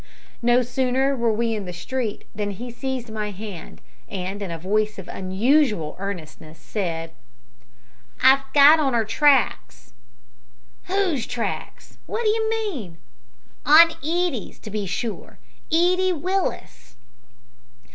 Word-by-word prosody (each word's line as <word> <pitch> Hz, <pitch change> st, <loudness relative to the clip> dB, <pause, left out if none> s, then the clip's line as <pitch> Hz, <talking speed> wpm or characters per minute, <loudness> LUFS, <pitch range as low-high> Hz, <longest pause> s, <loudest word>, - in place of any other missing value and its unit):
No 240 Hz, +1 st, +4 dB
sooner 260 Hz, +2 st, 0 dB
were 235 Hz, -2 st, +1 dB
we 225 Hz, +1 st, 0 dB
in 210 Hz, -3 st, -4 dB
the 180 Hz, -, -5 dB
street 220 Hz, +5 st, -4 dB
than 210 Hz, -1 st, -3 dB
he 235 Hz, +5 st, -7 dB
seized 255 Hz, -2 st, -5 dB
my 215 Hz, -1 st, -3 dB
hand, 200 Hz, -4 st, -9 dB, 0.3 s
and, 195 Hz, +1 st, -5 dB
in 195 Hz, -, -4 dB
a 165 Hz, -, -4 dB
voice 210 Hz, +5 st, -1 dB
of 190 Hz, -, -9 dB
unusual 210 Hz, -, +1 dB
earnestness, 160 Hz, -5 st, -7 dB
said 165 Hz, -2 st, -4 dB, 1.1 s
"I've 265 Hz, +1 st, +7 dB
got 295 Hz, +2 st, +7 dB
on 270 Hz, -5 st, +1 dB
'er 225 Hz, -2 st, +2 dB
tracks!" 235 Hz, -, +1 dB, 0.9 s
"Whose 365 Hz, -, 0 dB
tracks? 245 Hz, -2 st, -5 dB
What 465 Hz, -, -2 dB
do 435 Hz, -, +3 dB
you 440 Hz, 0 st, +1 dB
mean?" 355 Hz, -, -3 dB, 0.7 s
"On 320 Hz, +4 st, +8 dB
Edie's, 330 Hz, -, -1 dB
to 215 Hz, -, -9 dB
be 210 Hz, -1 st, -3 dB
sure 215 Hz, +4 st, -5 dB, 0.3 s
Edie 365 Hz, +3 st, +3 dB
Willis." 350 Hz, -, -3 dB
235 Hz, 125 wpm, -23 LUFS, 200-290 Hz, 1.1 s, On